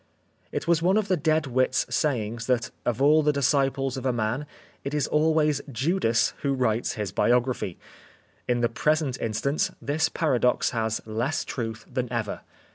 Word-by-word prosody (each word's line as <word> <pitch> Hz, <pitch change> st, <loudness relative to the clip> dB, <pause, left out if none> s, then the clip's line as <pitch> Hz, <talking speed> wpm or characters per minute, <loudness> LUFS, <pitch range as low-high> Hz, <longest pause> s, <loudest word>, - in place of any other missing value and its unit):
It -, -, -3 dB
was 170 Hz, -1 st, +3 dB
one 185 Hz, +4 st, +3 dB
of 210 Hz, -2 st, 0 dB
the 185 Hz, -, +4 dB
dead 155 Hz, -1 st, +1 dB
wit's 130 Hz, 0 st, +1 dB
sayings 115 Hz, -5 st, -1 dB
that 120 Hz, -3 st, 0 dB, 0.2 s
of 120 Hz, +2 st, +1 dB
all 155 Hz, +2 st, +6 dB
the 150 Hz, 0 st, +3 dB
disciples 135 Hz, -1 st, +1 dB
of 130 Hz, -, -5 dB
a -, -, +3 dB
man 120 Hz, +5 st, -2 dB, 0.4 s
it 140 Hz, +2 st, -3 dB
is 150 Hz, -, +1 dB
always 155 Hz, -1 st, +2 dB
Judas 125 Hz, -, +1 dB
who 140 Hz, -1 st, 0 dB
writes 120 Hz, -3 st, 0 dB
his 105 Hz, -5 st, -4 dB
biography. 120 Hz, -4 st, +1 dB, 0.7 s
In 120 Hz, -1 st, +1 dB
the 120 Hz, -, +3 dB
present 150 Hz, +2 st, 0 dB
instance 115 Hz, +7 st, 0 dB
this 145 Hz, +3 st, 0 dB
paradox 125 Hz, -6 st, +1 dB
has 110 Hz, -1 st, -1 dB
less 120 Hz, +9 st, -2 dB
truth 115 Hz, -2 st, -5 dB
than 125 Hz, -1 st, -3 dB
ever. 110 Hz, -4 st, -3 dB
130 Hz, 165 wpm, -26 LUFS, 115-150 Hz, 0.7 s, all